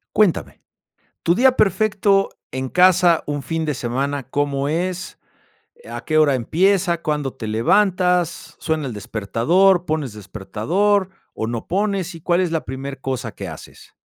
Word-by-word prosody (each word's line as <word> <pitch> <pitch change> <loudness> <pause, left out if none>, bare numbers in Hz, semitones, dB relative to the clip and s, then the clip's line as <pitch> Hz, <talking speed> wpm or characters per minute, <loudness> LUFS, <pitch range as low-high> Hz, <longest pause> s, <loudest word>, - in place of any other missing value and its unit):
Cuéntame, 210 -6 +1 0.6
tu 170 - +3
día 255 +6 +4
perfecto 195 0 +2 0.2
en 130 0 -3
casa, 180 +1 +4
un 145 -1 -3
fin 160 +5 -3
de 150 -2 -1
semana, 135 +3 -2
¿cómo 140 +1 -1
es? 180 +4 -3 0.7
¿A - - -6
qué 155 -1 +1
hora 150 -3 +4
empieza? 175 - +1
¿Cuándo 150 -3 -1
te 120 -4 -7
levantas? 180 - +1
¿Suena 160 -2 -2
el 125 - -4
despertador? 160 - +1
¿Pones 155 -6 -2
despertador, 135 - -1 0.2
o, 110 - -3
no 115 0 -4
pones? 195 -2 -1
¿Y 165 - -10
cuál 175 +3 +1
es 175 -3 -1
la 160 - -2
primer 135 +1 -6
cosa 130 -2 -4
que - - -7
haces? - - -12
160 Hz, 150 wpm, -21 LUFS, 135-185 Hz, 0.7 s, día